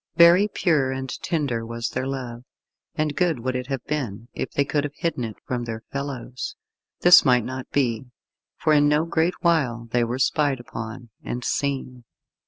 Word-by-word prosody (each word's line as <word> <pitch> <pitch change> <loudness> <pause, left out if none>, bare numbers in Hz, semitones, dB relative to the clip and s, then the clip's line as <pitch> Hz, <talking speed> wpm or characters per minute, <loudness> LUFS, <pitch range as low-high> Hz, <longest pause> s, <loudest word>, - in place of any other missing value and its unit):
Very 175 +4 +7
pure 155 -10 +1
and 130 0 -4
tender 140 -9 -1
was 115 +1 -3
their 130 - -3
love, 125 -3 -5 0.5
and 150 -1 -1
good 170 -9 +1
would 130 +1 -2
it 125 0 -3
have 135 -3 -3
been 120 -7 -3
if - - -3
they 140 - 0
could 145 0 0
have 145 0 -5
hidden 165 -7 -2
it 110 -2 -5
from 125 -1 -2
their 115 -1 -5
fellows. 135 -3 -5 0.5
This 175 +1 +9
might 125 -3 +4
not 130 0 -6
be, 125 -4 0 0.5
for 155 - +2
in 145 -1 +5
no 150 +2 +3
great 170 +1 +1
while 130 -9 +1
they 120 0 +3
were 120 +2 -2
spied 140 0 +1
upon, 115 0 -8
and 125 0 -4
seen. 135 -3 -2
130 Hz, 180 wpm, -24 LUFS, 120-150 Hz, 0.5 s, This